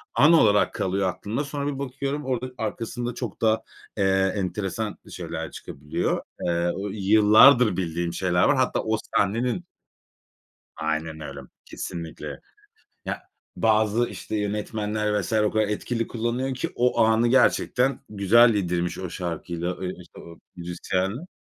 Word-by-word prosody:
an 155 +4 +6
olarak 105 -9 +4
kalıyor 95 0 0
aklımda. 110 +9 -3
Sonra 140 0 -4
bir 140 -2 -3
bakıyorum 140 +2 -3
orada 130 -1 -2
arkasında 115 +2 -3
çok 120 -5 -6
da, 110 0 +2 0.3
eee, 95 -1 +2
enteresan 100 +2 -3
şeyler - - -5
çıkabiliyor. 75 +1 -3 0.2
Eee, 85 0 +1
o 100 +1 -4
yıllardır 110 +3 +6
bildiğim 85 -1 -2
şeyler 90 0 +1
var. 145 - +4
Hatta 130 -1 +1
o 110 0 0 0.2
sahnenin 120 - 0 1.1
Aynen 80 0 -3
öyle 70 -2 -7 0.3
kesinlikle. 85 -3 -7 0.7
Ya, - - -4 0.3
bazı, 110 +1 +2
işte, 110 - -5
yönetmenler 105 0 -1
vs. 95 - -5
o 105 -1 +3
kadar 110 -1 +1
etkili 115 +2 -2
kullanıyor 120 +3 -2
ki 150 +7 -3
o 125 +1 +2
anı 110 +1 +4
gerçekten 130 +1 +3
güzel 110 +3 +5
yedirmiş 90 -3 -1
o 90 -2 -5
şarkıyla, 85 0 -4
eee, 90 - -3
işte, 90 - -13
o 85 0 -12 0.2
müzisyenle. 95 - -3
105 Hz, 135 wpm, -25 LUFS, 90-120 Hz, 1.1 s, an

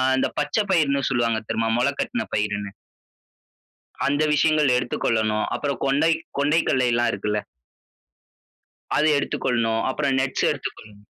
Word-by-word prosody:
அந்த 130 - +1
பச்சை 150 +9 0
பயிர்ன்னு 140 -6 +2
சொல்லுவாங்க 115 -2 +1
தெரியுமா? 115 0 0
முளைக்கட்டின 140 - -1
பயிர்ன்னு. 105 -1 -2 1.4
அந்த 145 +2 +1
விஷயங்கள் 150 -3 +3
எடுத்துக் 125 - -3
கொள்ளணும். 110 -1 +1
அப்புறம் 140 -4 -3
கொண்டை 145 +4 +3 0.3
கொண்டை 150 +3 +3
கடலை 130 -1 +2
எல்லாம் 120 0 +2
இருக்குல்ல. 105 +1 -1 1.6
அதை 155 +1 +3
எடுத்துக் 140 - -4
கொள்ளணும். 115 -2 +1
அப்புறம் 135 0 0
நட்ஸ் 130 0 0
எடுத்துக்கொள்ளணும். 105 -1 -8
130 Hz, 125 wpm, -23 LUFS, 115-145 Hz, 1.6 s, விஷயங்கள்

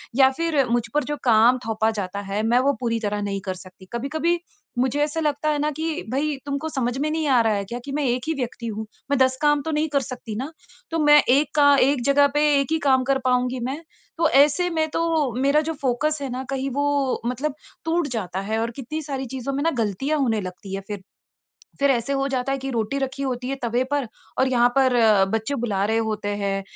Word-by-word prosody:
या 265 0 +6
फिर 325 -5 +1
मुझ 240 0 +2
पर 295 - +2
जो 295 - -3
काम 235 +1 +5
थोपा 220 0 +1
जाता 200 -2 -4
है 205 +2 0
मैं 235 +2 +3
वो 275 +2 +2
पूरी 230 -2 -1
तरह 210 -1 -2
नहीं 200 -1 -3
कर 190 - -1
सकती। 185 0 -14
कभी-कभी 315 +8 0 0.4
मुझे 260 +3 +1
ऐसा 300 +2 -2
लगता 300 -1 0
है 300 -1 +1
ना 300 +1 +1
कि 325 +1 -2
भई 290 +3 0
तुमको 280 +2 -3
समझ 255 -4 -1
में 295 +3 0
नहीं 315 -1 -1
आ 260 -3 +4
रहा 225 -1 +2
है 200 -1 -1
क्या 235 +5 -5
कि 280 - -6
मैं 295 +1 -1
एक 250 0 0
ही 320 - +1
व्यक्ति 245 -3 -4
हूँ। 220 0 -4 0.3
मैं 280 - +3
10 260 0 +3
काम 295 -1 +3
तो 320 - -3
नहीं 305 +1 +1
कर 280 - +3
सकती 245 -3 -7
न। 275 - -4 0.4
तो 330 - 0
मैं 295 0 +7
एक 280 +4 +4
का 285 -1 +6
एक 275 0 +3
जगह 285 0 +5
पे 295 - +3 0.2
एक 275 +3 -2
ही 320 - +3
काम 265 -3 +3
कर 270 +1 +2
पाऊँगी 250 0 +1
मैं, 270 +5 -3 0.4
तो 330 -1 +3
ऐसे 295 +5 +4
में 320 -2 0
तो 320 -4 0
मेरा 280 +3 +4
जो 320 +1 -3
फ़ोकस 285 +4 0
है 275 - -3
ना 255 +1 -3
कहीं 270 0 -2
वो 285 -2 +1
मतलब 265 +4 -2 0.3
टूट 330 -1 +1
जाता 185 -3 -3
है 220 0 0
और 230 +1 -1
कितनी 285 +4 -5
सारी 270 -2 -4
चीज़ों 265 +1 -3
में 280 +1 -1
ना 330 - +2
ग़लतियाँ 265 +10 -1
होने 225 -6 +1
लगती 185 +1 -8
है 195 - -4
फिर, 205 -2 -5 0.8
फिर 280 0 +3
ऐसे 255 +1 0
हो 275 0 0
जाता 265 0 -1
है 275 - -1
कि 270 +1 -4
रोटी 230 +2 -1
रखी 270 0 -3
होती 250 -2 -3
है 275 - -2
तबे 240 +2 +1
पर 285 -4 0 0.3
और 260 - +3
यहाँ 245 -1 +4
पर 260 -2 +4 0.4
बच्चे 225 +6 -3
बुला 200 -3 0
रहे 220 +2 +1
होते 210 -1 -3 0.2
हैं 195 0 -1
270 Hz, 235 wpm, -23 LUFS, 235-295 Hz, 0.8 s, मैं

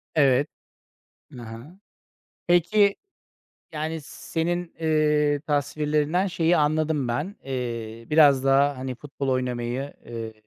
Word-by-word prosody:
Evet. 140 -1 +4 0.8
Hı 125 - -10
hı. 115 +11 -10 0.7
Peki, 200 +4 +4 0.8
yani 160 +1 -3
senin, 175 +3 -3
ııı, 150 -2 +2
tasvirlerinden 150 +3 0
şeyi 175 -2 +2
anladım 155 -2 +1
ben. 150 +12 -2
Eee, 115 -3 -5
biraz 145 -4 +5
daha, 135 +1 +3
hani, 130 0 -4
futbol 140 +1 -6
oynamayı, 125 +1 -2 0.2
ııı, 115 -1 -6
145 Hz, 105 wpm, -25 LUFS, 130-160 Hz, 0.8 s, biraz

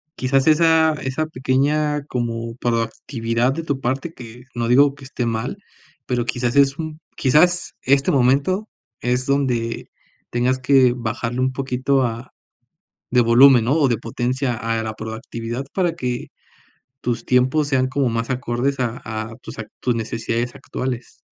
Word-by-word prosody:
quizás 135 +2 +1
esa 160 0 +5
esa 140 +1 -2
pequeña 150 +2 0
como 115 -1 -3
proactividad 115 +1 -1
de 165 +3 -4
tu 140 -4 -2
parte 135 +7 -2
que, 120 -2 -11
no 115 -1 -1
digo 140 +2 +5
que 145 - -15
esté 130 -2 -3
mal, 115 - -2 0.5
pero 125 -2 0
quizás 125 0 -1
es 140 0 +4
un, 155 -1 -5 0.2
quizás 175 +6 +3
este 135 +1 +3
momento, 140 - +2 0.3
es 125 +1 0
donde 125 -5 -1 0.4
tengas 125 +2 +1
que 130 -2 +4
bajarle 120 +1 -3
un 130 - +2
poquito, 130 +1 0
ah, 120 +1 -4 0.8
de 125 0 +4
volumen, 120 +1 +6
¿no?, 130 +6 +2
o 145 - +4
de 120 -3 +1
potencia 125 +2 -2
a 115 -1 -2
la 110 0 -3
proactividad 115 +3 -5
para 175 -3 +1
que 125 -5 -3 0.8
tus 120 -1 -2
tiempos 130 +4 +2
sean 130 -2 +2
como 135 -1 0
más 115 +2 -2
acordes 130 +2 -1
a 120 -1 -2
a 110 0 -5
tus - - -9
a 115 - -4 0.2
tus 125 -2 +1
necesidades 115 +1 -2
actuales. 125 -2 -5
125 Hz, 150 wpm, -21 LUFS, 115-140 Hz, 0.8 s, volumen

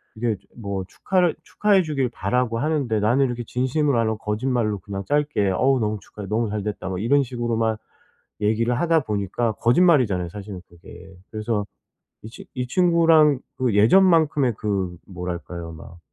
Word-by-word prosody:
이게 110 -2 -1 0.2
뭐 100 -4 -4
축하를 180 -3 0
축하해 200 0 +2
주길 140 -6 -1
바라고 125 0 -1
하는데 140 -6 0
나는 120 +6 +3
이렇게 120 -2 -3
진심으로 130 +2 0
안 115 - +1
하고 110 0 -1
거짓말로 105 0 -1
그냥 100 +1 -6
짧게 145 -6 +1
"어우 130 +7 +2
너무 105 -1 -1
축하해. 100 +1 -10
너무 110 +1 0
잘 105 -1 -3
됐다." 105 -2 -4
뭐 95 - -3
이런 135 +7 +3
식으로만 115 -3 -1 0.6
얘기를 115 +3 +1
하다 165 -2 +3
보니까 105 0 -1
거짓말이잖아요, 120 - +3
사실은 100 0 -8
그게. 85 +2 -14 0.2
그래서 110 -1 -2 0.6
이 110 - -8
친 - - -12
이 125 0 -3
친구랑 165 -4 +4 0.2
그 125 -5 0
예전만큼의 150 - +4
그 95 -4 -2
뭐랄까요? 90 -2 -6
막 80 +2 -12
115 Hz, 360 characters per minute, -23 LUFS, 105-135 Hz, 0.6 s, 친구랑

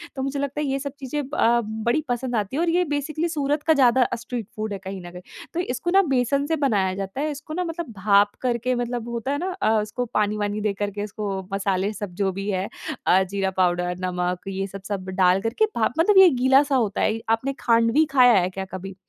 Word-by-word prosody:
तो 265 - -3
मुझे 275 +1 -2
लगता 280 +1 -2
है 295 - -1
ये 270 0 -1
सब 280 0 -4
चीज़ें 280 +2 -3
ब 300 - -19
अ, 235 +1 +3
बड़ी 220 +6 -1
पसंद 245 0 -2
आती 210 +4 -2
हैं 320 - 0
और 345 - +1
ये 355 +2 +3
बेसिकली 300 +3 -2
सूरत 295 -1 -1
का 320 - +4
ज़्यादा 260 -2 +4
अ, - - -2
स्ट्रीट 235 -2 -6
फूड 215 -1 -3
है 195 - -5
कहीं 190 0 -7
न 175 - -10
कहीं, 180 0 -10 0.3
तो 340 - -2
इसको 305 -1 -2
न 390 - +8
बेसन 270 +2 +1
से 320 +2 0
बनाया 205 -10 +1
जाता 195 +7 -4
है। 305 +1 -1
इसको 295 +2 -8
ना 360 +3 -1
मतलब 330 -5 -5
भाप 200 +1 +4
करके 250 0 0
मतलब 240 -1 -3
होता 235 +3 -3
है 285 - 0
ना 370 +5 -3
अ, - - +3
उसको 215 +4 -3
पानी-वानी 210 -1 -1
दे 210 -1 0
कर 205 +1 -3
के 205 +1 -5
इसको 210 0 -6 0.3
मसाले 195 0 0
सब 205 -2 -6
जो 195 -1 0
भी 195 +2 -4
है, 190 0 -1 0.4
अ, 190 +1 +5
जीरा 190 0 -2
पाउडर, 180 -1 +1
नमक 180 0 -2
ये 195 0 -2
सब 195 0 -9
सब 190 -2 -4
डाल 185 +1 +4
करके 230 - +1
भाप, 230 +1 +1
मतलब 385 +4 +4
ये 380 -2 +9
गीला-सा 270 +2 +3
होता 220 -6 0
है - - +2
ये। 225 - -5
आपने 240 +5 +1
खाँडवी 230 +6 +3
खाया 250 -3 +6
है 180 0 0
क्या 190 +1 -5
कभी? 190 0 -6
230 Hz, 240 wpm, -23 LUFS, 195-275 Hz, 0.4 s, ये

